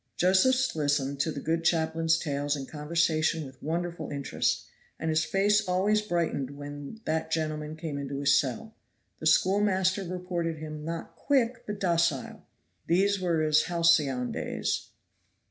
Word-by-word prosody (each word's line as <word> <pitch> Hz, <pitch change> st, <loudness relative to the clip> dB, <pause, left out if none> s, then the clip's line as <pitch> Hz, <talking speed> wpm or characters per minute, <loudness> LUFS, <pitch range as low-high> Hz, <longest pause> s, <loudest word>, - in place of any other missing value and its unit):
Josephs 250 Hz, +8 st, +3 dB
listened 145 Hz, -2 st, 0 dB
to 160 Hz, -, +1 dB
the 145 Hz, -, -5 dB
good 165 Hz, +3 st, -1 dB
chaplain's 165 Hz, 0 st, +2 dB
tales 145 Hz, -2 st, -1 dB
and 135 Hz, -2 st, -6 dB
conversation 160 Hz, 0 st, 0 dB
with 130 Hz, -1 st, -13 dB
wonderful 170 Hz, +2 st, -3 dB
interest, 140 Hz, -1 st, -1 dB, 0.3 s
and 160 Hz, 0 st, -1 dB
his 155 Hz, +1 st, +2 dB
face 200 Hz, +5 st, +2 dB
always 195 Hz, +4 st, +2 dB
brightened 165 Hz, -8 st, -2 dB
when 145 Hz, +7 st, -8 dB
that 160 Hz, 0 st, -1 dB
gentleman 155 Hz, -1 st, -2 dB
came 155 Hz, -3 st, -5 dB
into 140 Hz, 0 st, -4 dB
his 140 Hz, 0 st, +4 dB
cell. 145 Hz, -, -4 dB, 0.5 s
The -, -, -1 dB
schoolmaster 190 Hz, 0 st, +3 dB
reported 175 Hz, -2 st, -3 dB
him 155 Hz, -1 st, -7 dB
not 165 Hz, +1 st, -5 dB
quick, 255 Hz, -3 st, 0 dB
but 210 Hz, -1 st, -4 dB
docile. 170 Hz, -7 st, 0 dB, 0.4 s
These 195 Hz, +3 st, +3 dB
were 170 Hz, -3 st, +1 dB
his 155 Hz, 0 st, +3 dB
halcyon 160 Hz, -7 st, +2 dB
days. -, -, -2 dB
165 Hz, 145 wpm, -28 LUFS, 150-185 Hz, 0.5 s, his